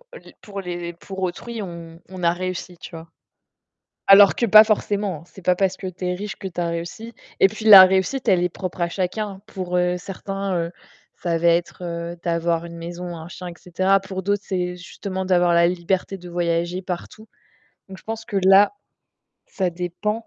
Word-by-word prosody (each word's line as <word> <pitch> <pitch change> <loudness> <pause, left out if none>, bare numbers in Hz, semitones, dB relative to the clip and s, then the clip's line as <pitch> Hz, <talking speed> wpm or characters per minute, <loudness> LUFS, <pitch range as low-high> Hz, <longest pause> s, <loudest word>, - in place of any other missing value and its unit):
les - - -13
pour 200 -2 -7
les 175 -1 -5
pour 190 +3 -9
autrui, 220 +5 -4
on 170 -2 -9
on 185 -2 -8
a 170 0 +3
réussi, 180 0 -5
tu - - -10
vois? 165 -1 -10 1.0
Alors 200 0 +8
que 235 - +1
pas 215 +1 +9
forcément, 205 -6 -1
c'est 190 - -15
pas 180 0 +2
parce 190 -1 +1
que 190 - -6
tu 180 0 -6
es 180 - 0
riche 200 +3 -6
que 195 - -8
tu 175 -1 -5
as 170 - -1
réussi 170 +8 -6 0.3
et 195 - +7
puis, 215 +2 -9
la 200 -3 +12
réussite, 190 +7 0
elle 180 -3 +4
est - - +2
propre 185 +1 -6
à 170 - +1
chacun. 195 +2 -3
Pour, 185 -4 -4
heu, 180 0 +1
certains, 195 +1 -4
heu, 170 +1 -2 0.4
ça 170 -1 -2
va 170 +1 +3
être 170 0 -2
d'avoir 170 0 0
une 170 0 -10
maison, 175 +1 -6
un 160 0 -9
chien 180 0 -8
et 175 - -9
cetera. 185 +2 +1
Pour 190 0 -6
d'autres, 200 +1 0
c'est 180 -2 -2
justement 190 +1 -6
d'avoir 175 -2 +3
la 170 0 +5
liberté 185 +2 -2
de 180 0 -11
voyager 175 +1 -1
partout. 190 +4 -7 0.6
Donc, 190 0 -10
je - - -17
pense 225 0 -5
que 220 -3 -5
là, 195 +2 +6 0.7
ça 185 -3 -2
dépend. 180 +6 -4
180 Hz, 195 wpm, -22 LUFS, 175-195 Hz, 1.0 s, la